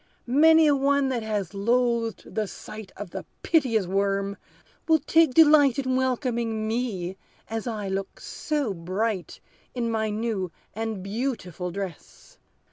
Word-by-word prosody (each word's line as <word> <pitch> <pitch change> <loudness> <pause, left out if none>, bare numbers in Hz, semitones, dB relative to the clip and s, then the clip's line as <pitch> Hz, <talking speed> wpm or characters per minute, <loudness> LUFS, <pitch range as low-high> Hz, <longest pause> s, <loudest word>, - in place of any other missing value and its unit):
"Many 320 +5 +6
a 290 -2 +5
one 280 0 +2
that 250 -3 -1
has 210 -5 -3
loathed 235 +2 0
the 215 -1 -1
sight 215 +1 -9
Of 200 -3 -7
the 190 - -5 0.2
piteous 250 - +2
worm, 195 +1 0 0.5
will 320 -1 +6
take 315 -1 +3
delight 295 -5 +6
In 260 -2 0
welcoming 235 -4 -1
me, 210 -6 -2 0.3
as 225 +1 -4
I 215 -4 -3
look 195 0 -4
so 290 -9 -2
bright 185 +3 -3 0.4
In 235 -2 -1
my 220 -1 0
new 210 -4 -2 0.2
and 220 -3 -4
beautiful 195 - -3
dress. 185 -2 -8
225 Hz, 135 wpm, -26 LUFS, 195-260 Hz, 0.5 s, Many